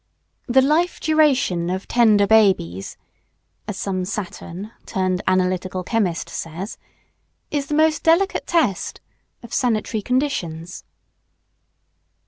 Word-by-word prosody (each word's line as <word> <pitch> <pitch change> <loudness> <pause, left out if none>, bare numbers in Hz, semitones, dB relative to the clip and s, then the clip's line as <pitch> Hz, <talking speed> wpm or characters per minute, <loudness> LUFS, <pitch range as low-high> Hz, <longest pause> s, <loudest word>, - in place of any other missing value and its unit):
"The 260 +2 +4
life 320 +6 +1
duration 275 - +2
of 190 +1 -3
tender 215 -4 +4
babies" 190 - +2 0.7
(as - - -4
some 185 -2 -2
Saturn, 195 0 -6 0.2
turned 185 -1 -1
analytical 185 0 0
chemist, 185 -5 -1
says) 170 +6 -6 0.7
"is 285 -2 -1
the 300 - -1
most 310 0 +3
delicate 340 +4 +2
test" 305 - 0 0.4
of 235 - -10
sanitary 220 -3 0
conditions. 185 - -2
210 Hz, 105 wpm, -21 LUFS, 185-275 Hz, 0.7 s, The